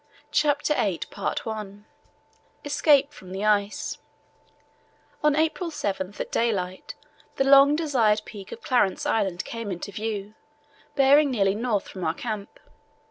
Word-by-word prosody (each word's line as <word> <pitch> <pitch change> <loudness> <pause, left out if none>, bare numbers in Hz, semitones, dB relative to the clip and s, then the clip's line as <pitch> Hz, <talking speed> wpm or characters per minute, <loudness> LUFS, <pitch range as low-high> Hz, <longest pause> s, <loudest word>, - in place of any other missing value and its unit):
CHAPTER 295 0 +2
VIII 205 - -3 0.8
ESCAPE 290 -1 +3
FROM 185 -1 -13
THE 195 +2 -3
ICE 205 -1 0 1.2
On 300 -1 +4
April 320 +3 0
7 200 - -3
at - - -4
daylight 190 -6 -1 0.4
the - - +2
long 275 +1 +7
desired 240 -10 +2
peak 200 -3 -10
of 230 - -9
Clarence 240 -7 +1
Island 195 -5 0
came 230 -2 -5
into 185 +3 -5
view, 210 0 -4 0.6
bearing 280 +1 +5
nearly 195 -6 +2
north 215 -2 -1
from 185 - -8
our 160 0 0
camp. 215 -2 -6
215 Hz, 125 wpm, -25 LUFS, 200-275 Hz, 1.2 s, long